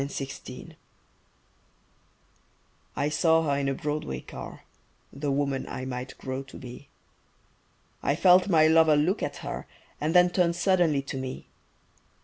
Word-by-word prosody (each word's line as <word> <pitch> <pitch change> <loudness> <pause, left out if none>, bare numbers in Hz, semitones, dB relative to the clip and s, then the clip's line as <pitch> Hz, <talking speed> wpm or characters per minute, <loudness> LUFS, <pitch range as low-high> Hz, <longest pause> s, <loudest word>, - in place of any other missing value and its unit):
THE 140 - -3 0.2
OLD - - -11
MAID - - -10 2.2
I 140 - 0
SAW 160 +1 +3
her 140 -2 0
in 140 -1 0
a 135 - -1
Broadway 150 - -3
car, - - -9 0.5
The 145 +1 -3
woman 140 -1 -1
I 130 - -5
might 125 0 -6
grow 130 0 -4
to 135 - -12
be; 125 +2 -10 1.1
I 140 - +1
felt 180 +3 +5
my 160 -4 +5
lover 160 -1 +5
look 165 +8 +1
at - - -3
her - - -5 0.3
And 155 +3 0
then 180 0 +6
turn 175 -2 +2
suddenly 175 -5 +2
to 135 - -5
me. 130 -1 -6
150 Hz, 145 wpm, -27 LUFS, 135-165 Hz, 2.2 s, then